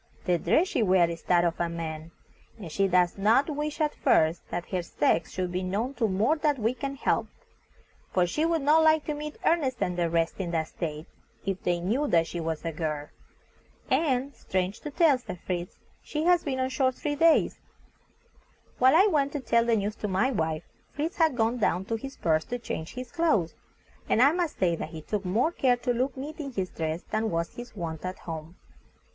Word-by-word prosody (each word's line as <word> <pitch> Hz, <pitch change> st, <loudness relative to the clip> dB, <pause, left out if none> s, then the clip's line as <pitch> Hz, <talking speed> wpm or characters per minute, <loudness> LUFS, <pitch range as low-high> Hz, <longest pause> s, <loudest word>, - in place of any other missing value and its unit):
The 175 Hz, -2 st, +2 dB
dress 355 Hz, -, +2 dB
she 330 Hz, -, 0 dB
wears 185 Hz, -4 st, +4 dB
is 165 Hz, -, -7 dB
that 175 Hz, -1 st, +4 dB
of 170 Hz, -1 st, -1 dB
a 170 Hz, -1 st, 0 dB
man, 160 Hz, -1 st, -5 dB, 0.5 s
and 185 Hz, -8 st, -8 dB
she 195 Hz, +4 st, +2 dB
does 180 Hz, 0 st, +2 dB
not 230 Hz, +9 st, +3 dB
wish 295 Hz, +1 st, -3 dB
at 305 Hz, -1 st, +1 dB
first 160 Hz, +2 st, +2 dB
that 175 Hz, -, -4 dB
her 185 Hz, -2 st, -1 dB
sex 165 Hz, -1 st, +1 dB
should 180 Hz, -1 st, -3 dB
be 180 Hz, +1 st, -1 dB
known 205 Hz, +8 st, -2 dB
to 235 Hz, -4 st, 0 dB
more 215 Hz, +10 st, +2 dB
that 300 Hz, -2 st, +1 dB
we 225 Hz, +1 st, +1 dB
can 275 Hz, +2 st, -4 dB
help, -, -, 0 dB, 0.8 s
for 180 Hz, -1 st, +3 dB
she 300 Hz, -, -1 dB
would 330 Hz, -2 st, +1 dB
not 305 Hz, +3 st, +5 dB
like 315 Hz, -1 st, +4 dB
to 305 Hz, -, -2 dB
meet 300 Hz, +1 st, -6 dB
Ernest 285 Hz, -7 st, +2 dB
and 180 Hz, -, -1 dB
the 170 Hz, -1 st, +1 dB
rest 165 Hz, +2 st, 0 dB
in 185 Hz, -3 st, -2 dB
that 160 Hz, -2 st, -1 dB
state, 155 Hz, -2 st, -5 dB, 0.4 s
if 195 Hz, -1 st, -2 dB
they 175 Hz, -1 st, 0 dB
knew 235 Hz, +12 st, 0 dB
that 165 Hz, -9 st, +3 dB
she 170 Hz, -, -5 dB
was 160 Hz, -1 st, -3 dB
a 165 Hz, -, -1 dB
girl. 150 Hz, -2 st, -3 dB, 0.8 s
And, 270 Hz, -1 st, +1 dB
strange 190 Hz, 0 st, -2 dB
to 300 Hz, -, -6 dB
tell," 290 Hz, -2 st, +4 dB
said 185 Hz, -7 st, -8 dB
Fritz, 175 Hz, -1 st, -4 dB, 0.2 s
"she 300 Hz, 0 st, -3 dB
has 350 Hz, 0 st, +4 dB
been 265 Hz, -3 st, -2 dB
on 260 Hz, 0 st, 0 dB
shore 260 Hz, -1 st, +2 dB
three 290 Hz, +3 st, -3 dB
years." 325 Hz, +2 st, +3 dB, 1.2 s
While 260 Hz, +3 st, +6 dB
I 375 Hz, +5 st, +7 dB
went 290 Hz, -8 st, +2 dB
to 290 Hz, -, -2 dB
tell 235 Hz, -3 st, +2 dB
the 235 Hz, -1 st, +3 dB
news 210 Hz, 0 st, -1 dB
to 210 Hz, -, -3 dB
my 200 Hz, +7 st, +1 dB
wife, 160 Hz, -7 st, -1 dB, 0.3 s
Fritz 315 Hz, +5 st, -4 dB
had 320 Hz, -6 st, +3 dB
gone 230 Hz, +2 st, +1 dB
down 190 Hz, -3 st, +1 dB
to 225 Hz, -, -2 dB
his 270 Hz, +5 st, -7 dB
berth 160 Hz, -1 st, +1 dB
to 245 Hz, -, -2 dB
change 200 Hz, -5 st, -6 dB
his 255 Hz, -1 st, -6 dB
clothes, 310 Hz, -, +1 dB, 0.6 s
and -, -, +3 dB
I 275 Hz, +4 st, +7 dB
must 345 Hz, -2 st, -1 dB
say 175 Hz, -3 st, +2 dB
that -, -, -5 dB
he 160 Hz, -2 st, -9 dB
took 205 Hz, +4 st, -2 dB
more 225 Hz, -, +2 dB
care 255 Hz, -7 st, +2 dB
to 245 Hz, 0 st, -1 dB
look 255 Hz, +3 st, -1 dB
neat 300 Hz, +4 st, -7 dB
in 275 Hz, -3 st, -5 dB
his 190 Hz, -4 st, -2 dB
dress 160 Hz, +1 st, -3 dB
than 220 Hz, +1 st, -1 dB
was 170 Hz, -2 st, -2 dB
his 240 Hz, -1 st, -9 dB
wont 165 Hz, -4 st, -5 dB
at 185 Hz, 0 st, -4 dB
home. 160 Hz, +1 st, -7 dB
220 Hz, 215 wpm, -27 LUFS, 175-280 Hz, 1.2 s, I